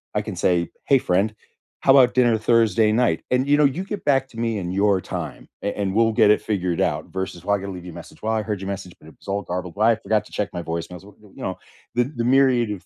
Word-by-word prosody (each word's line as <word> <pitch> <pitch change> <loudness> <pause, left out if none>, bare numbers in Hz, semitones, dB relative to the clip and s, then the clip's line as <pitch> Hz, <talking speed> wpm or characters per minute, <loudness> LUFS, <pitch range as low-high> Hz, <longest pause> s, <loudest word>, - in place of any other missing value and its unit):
I - - +2
can - - -6
say, 85 -2 +1 0.2
"Hey 135 -2 +4
friend, 100 +1 +1 0.5
how 135 - +5
about 125 -2 +5
dinner 120 -3 +3
Thursday 110 -1 +3
night?", 110 -7 +1
and 125 +2 +2
you 145 +1 +4
know, 150 - +5
you 140 +7 0
get 205 0 -6
back 135 -2 +2
to 115 - -14
me 115 -2 -1
in 90 -2 -4
your 100 0 +2
time, - - -6
a - - -1
and 95 -1 -1
we'll 115 0 +4
get 110 -2 +5
it 105 - +3
figured 90 -5 -1
out - - -1
versus 95 -2 -5
why 100 +1 +2
I - - -3
gotta 100 +1 -6
leave 90 -2 -8
you 90 - -7
a - - -13
message. 85 - -12
"Well, 110 - -1
I 110 -1 0
heard 105 -2 -4
your 95 - -5
message, 95 -2 -6
but - - -17
it - - -18
was - - -20
all 100 +1 -1
garbled". 90 -1 -5
"Why 110 +3 +4
I - - +2
forgot 110 0 0
to - - -17
check 105 - -2
my 90 - -3
voicemails", 85 +2 -5
you 105 0 -16
know, 95 - -3 0.4
the 120 - +3
the 130 -3 -4
myriad 125 -3 +3
of 100 -3 -7
105 Hz, 275 wpm, -22 LUFS, 95-120 Hz, 0.5 s, how